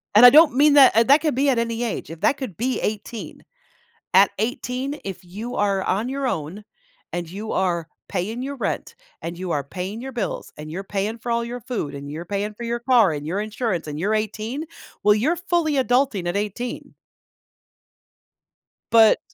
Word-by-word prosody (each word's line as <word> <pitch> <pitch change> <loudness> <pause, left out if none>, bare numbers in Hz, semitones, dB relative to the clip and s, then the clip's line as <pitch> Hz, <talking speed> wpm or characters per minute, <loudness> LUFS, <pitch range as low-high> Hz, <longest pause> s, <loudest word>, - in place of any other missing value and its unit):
and 225 +4 +9
I - - +13
don't 300 -1 +7
mean 290 +2 +5
that 280 -2 +8
and 230 +1 +4
that 285 +2 +7
could 305 -5 0
be 275 +2 +2
at 250 -3 +2
any 230 0 -1
age, 230 -9 -3
If 165 +1 -9
that 270 +7 +3
could 235 - -6
be 250 +3 -1
18. 215 +2 -5 0.7
At 195 +1 +6
18, 250 +5 -2
if 190 -1 -6
you 210 +7 -7
are 200 -2 +1
on 210 +7 0
your 275 0 -2
own, 165 +1 -4 0.5
and 175 -1 -3
you 205 +5 -6
are 175 -3 0 0.2
paying 220 +7 -3
your 280 +1 -4
rent, 255 - -3 0.3
and 170 +1 -5
you 185 0 -5
are 145 - 0
paying 185 - -6
your 265 - -6
bills, 235 -6 -4
and 155 0 -8
you're 185 +4 -5
paying 205 +3 -2
for 235 +1 -5
all 235 0 +1
your 240 +1 -5
food, 235 - -4
and 140 0 -7
you're 160 +3 -5
paying 205 +3 -3
for 235 - -9
your 235 0 -2
car, 235 -6 +4
and 145 0 -5
your 185 +5 -1
insurance, 215 -5 -2
and 150 0 -5
you're 205 +6 0
18, 220 +7 -2 0.4
well, 210 0 +6
you're 275 +11 +1
fully 345 -3 0
adulting 250 -7 +1
at 175 +3 -1
18. 210 +4 -4 2.0
But 225 -2 +6
220 Hz, 195 wpm, -23 LUFS, 190-250 Hz, 2.0 s, I